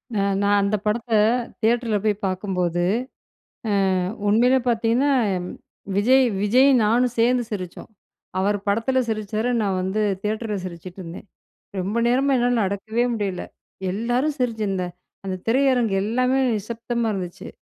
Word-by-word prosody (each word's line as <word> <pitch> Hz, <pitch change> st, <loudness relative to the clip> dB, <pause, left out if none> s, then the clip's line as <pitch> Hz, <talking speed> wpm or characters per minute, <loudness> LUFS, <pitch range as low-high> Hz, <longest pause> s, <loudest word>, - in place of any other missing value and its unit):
அ -, -, +1 dB, 0.2 s
நான் 205 Hz, 0 st, +3 dB
அந்த 200 Hz, +2 st, +1 dB
படத்த 225 Hz, +2 st, -1 dB, 0.5 s
தியேட்டர்ல 230 Hz, -1 st, +2 dB
போய் 215 Hz, -1 st, +3 dB
பார்க்கும்போது, 180 Hz, -2 st, -1 dB, 1.2 s
அ -, -, -1 dB, 0.3 s
உண்மையிலே 245 Hz, +5 st, +4 dB
பார்த்தீங்கன்னா, 235 Hz, +4 st, +2 dB, 0.9 s
விஜய், 255 Hz, +6 st, +5 dB, 0.2 s
விஜயும் 255 Hz, +4 st, +5 dB
நானும் 240 Hz, +3 st, +2 dB
சேர்ந்து 240 Hz, +1 st, +3 dB
சிரிச்சோம். 185 Hz, -5 st, -6 dB, 0.5 s
அவர் 205 Hz, +2 st, +1 dB
படத்துல 230 Hz, +6 st, +1 dB
சிரிச்சாரு, 215 Hz, +1 st, -2 dB
நான் 195 Hz, -3 st, 0 dB
வந்து 190 Hz, +3 st, -1 dB, 0.2 s
தியேட்டர்ல 215 Hz, 0 st, -2 dB
சிரிச்சிட்டுருந்தேன். 180 Hz, +1 st, -8 dB, 0.5 s
ரொம்ப 205 Hz, +6 st, -1 dB
நேரமா 270 Hz, +3 st, +2 dB
என்னால 240 Hz, -3 st, +2 dB
அடக்கவே 220 Hz, +4 st, -1 dB
முடியல. 200 Hz, -5 st, -2 dB, 0.5 s
எல்லாரும் 245 Hz, +8 st, 0 dB
சிரிச்சு 230 Hz, -3 st, -1 dB
இந்த 185 Hz, -1 st, -1 dB, 0.4 s
அந்த 190 Hz, -1 st, -2 dB
திரையரங்கு 245 Hz, -4 st, +2 dB
எல்லாமே 255 Hz, +5 st, +1 dB, 0.2 s
நிசப்தமா 230 Hz, +2 st, -3 dB
இருந்துச்சு. 180 Hz, -3 st, -6 dB
220 Hz, 120 wpm, -23 LUFS, 200-245 Hz, 1.2 s, விஜய்